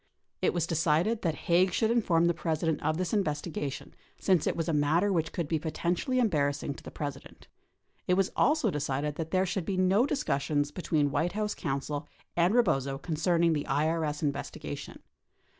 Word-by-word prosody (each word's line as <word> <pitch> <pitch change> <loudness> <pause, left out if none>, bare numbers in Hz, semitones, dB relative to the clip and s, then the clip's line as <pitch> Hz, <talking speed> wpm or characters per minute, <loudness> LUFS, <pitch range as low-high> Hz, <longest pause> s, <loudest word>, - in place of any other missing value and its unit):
It - - +3
was 170 -2 0
decided 165 +6 +1
that 165 -4 0
Haig 180 +2 +4
should 220 +5 +1
inform 175 -8 +3
the 170 - +3
President 160 -1 -1
of 155 +1 0
this 185 +2 -2
investigation 150 -6 -2 0.3
since 185 -5 +2
it - - +1
was 165 0 -2
a 165 - 0
matter 160 +7 +2
which 165 -3 0
could 170 -4 -3
be 160 +1 0
potentially 175 - -1
em 240 - +4
barrassing 145 -4 -1
to - - -13
the - - -8
President. 145 -2 -7 0.6
It 180 - +3
was 195 0 +1
also 305 +3 +3
decided 145 0 -2
that 160 -1 -3
there 185 +2 +2
should 185 0 -2
be 190 +2 -2
no 190 +7 +3
discussions 145 - 0
between 150 -4 0
White 175 +5 0
House 210 0 -1
counsel 145 +2 -3 0.3
and 175 +2 +3
Eebozo 135 - +2
concerning 165 +1 +1
the 145 -2 -2
IES 155 +1 0
investigation. 140 -2 -4
165 Hz, 175 wpm, -29 LUFS, 150-185 Hz, 0.6 s, Haig